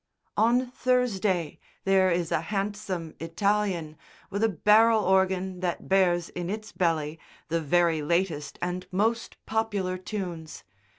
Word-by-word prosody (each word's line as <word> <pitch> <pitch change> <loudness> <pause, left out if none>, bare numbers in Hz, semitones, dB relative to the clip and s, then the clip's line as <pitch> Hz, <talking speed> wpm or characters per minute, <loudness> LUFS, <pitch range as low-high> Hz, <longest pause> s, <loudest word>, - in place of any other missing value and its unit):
On 245 +4 +2
Thursday 210 - 0 0.2
there 190 -1 +4
is 170 -1 0
a - - +1
handsome 195 -3 -3
Italian 170 -2 -1 0.3
with 200 +3 -1
a 225 - +4
barrel 215 +4 +4
organ 190 -1 +1
that 175 -2 -3
bears 175 -3 +2
in 175 0 -5
its 215 +1 -5
belly 160 -3 -1 0.3
the 165 +1 0
very 165 +1 +2
latest 160 -2 -1
and 180 +1 -3
most 225 +5 0
popular 205 -5 -1
tunes. 170 - -6
185 Hz, 125 wpm, -27 LUFS, 170-210 Hz, 0.3 s, there